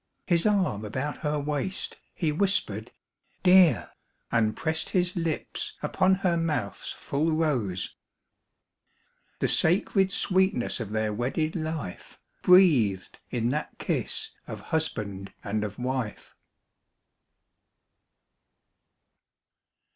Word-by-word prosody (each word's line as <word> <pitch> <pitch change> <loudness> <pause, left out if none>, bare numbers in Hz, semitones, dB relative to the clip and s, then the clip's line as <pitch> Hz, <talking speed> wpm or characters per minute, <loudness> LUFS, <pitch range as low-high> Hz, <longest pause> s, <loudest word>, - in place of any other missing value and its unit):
His 170 +1 +3
arm 185 - +1
about 130 +7 -3
her 150 0 -1
waist, 150 +6 -2 0.2
he 160 -4 0
whispered 195 +6 0 0.5
"Dear," 180 - +5 0.4
And 110 -2 +1
pressed 160 0 0
his 180 -1 +1
lips 165 -3 -2
upon 190 +1 +3
her 170 -2 +3
mouth's 150 -11 -2
full 155 +4 -1
rose— 125 - -1 1.4
The - - 0
sacred 190 +3 +3
sweetness 190 -11 +2
of 115 -4 -4
their 110 0 -1
wedded 140 - -1
life 155 - -5 0.2
Breathed 140 - +4
in 120 -1 0
that 150 +4 -3
kiss - - -2 0.2
of - - -6
husband 100 -11 -2
and 105 +1 -2
of 105 -1 -5
wife. 125 -3 -4
150 Hz, 100 wpm, -27 LUFS, 110-175 Hz, 1.4 s, Dear